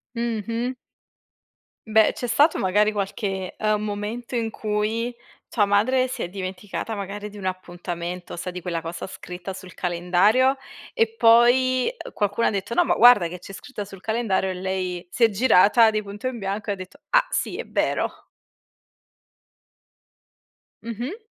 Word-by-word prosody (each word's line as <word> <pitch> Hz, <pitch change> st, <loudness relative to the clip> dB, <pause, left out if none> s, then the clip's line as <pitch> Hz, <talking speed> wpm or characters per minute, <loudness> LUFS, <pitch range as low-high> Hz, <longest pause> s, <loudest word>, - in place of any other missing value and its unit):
Mh-mh. 235 Hz, +1 st, -2 dB, 1.2 s
Beh, 220 Hz, 0 st, +5 dB
c'è 245 Hz, -, -5 dB
stato 290 Hz, +7 st, +3 dB
magari 205 Hz, +3 st, +3 dB
qualche, 195 Hz, -2 st, -3 dB
ehm, 215 Hz, -1 st, +1 dB
momento 215 Hz, +4 st, -4 dB
in 230 Hz, -2 st, 0 dB
cui 220 Hz, +3 st, -2 dB, 0.3 s
tua 215 Hz, -, +1 dB
madre 250 Hz, +6 st, +2 dB
si 255 Hz, -2 st, -5 dB
è -, -, -1 dB
dimenticata, 190 Hz, +3 st, -5 dB
magari, 205 Hz, +1 st, -5 dB
di 205 Hz, -, -12 dB
un 195 Hz, -, -7 dB
appuntamento, 175 Hz, -1 st, -5 dB
sai 180 Hz, +2 st, -5 dB
di 180 Hz, 0 st, -7 dB
quella 170 Hz, -2 st, -3 dB
cosa 165 Hz, +3 st, -6 dB
scritta 180 Hz, 0 st, -7 dB
sul 185 Hz, -1 st, -10 dB
calendario 185 Hz, +10 st, +2 dB, 0.4 s
e 455 Hz, -2 st, +3 dB
poi, 250 Hz, -, +5 dB
uhm, -, -, -9 dB
qualcuno 205 Hz, +2 st, 0 dB
ha -, -, +4 dB
detto: 200 Hz, +2 st, -3 dB
"No 355 Hz, -, +4 dB
ma -, -, +2 dB
guarda 235 Hz, -8 st, +7 dB
che 180 Hz, +1 st, -8 dB
c'è 195 Hz, -, -11 dB
scritta 210 Hz, +1 st, -7 dB
sul 195 Hz, -2 st, -12 dB
calendario." 220 Hz, -3 st, 0 dB
E -, -, -2 dB
lei 185 Hz, -1 st, -3 dB
si 240 Hz, -, 0 dB
è 230 Hz, -, +7 dB
girata 220 Hz, +1 st, +5 dB
di 215 Hz, -1 st, -1 dB
punto 205 Hz, +5 st, -6 dB
in 255 Hz, -2 st, -3 dB
bianco 200 Hz, +1 st, -3 dB
e -, -, +1 dB
ha -, -, -4 dB
detto: 185 Hz, -1 st, -11 dB
"Ah -, -, +5 dB
sì, -, -, -1 dB
è -, -, -5 dB
vero"? -, -, 0 dB, 2.7 s
Mh-mh. 240 Hz, -, -5 dB
205 Hz, 160 wpm, -24 LUFS, 185-235 Hz, 2.7 s, guarda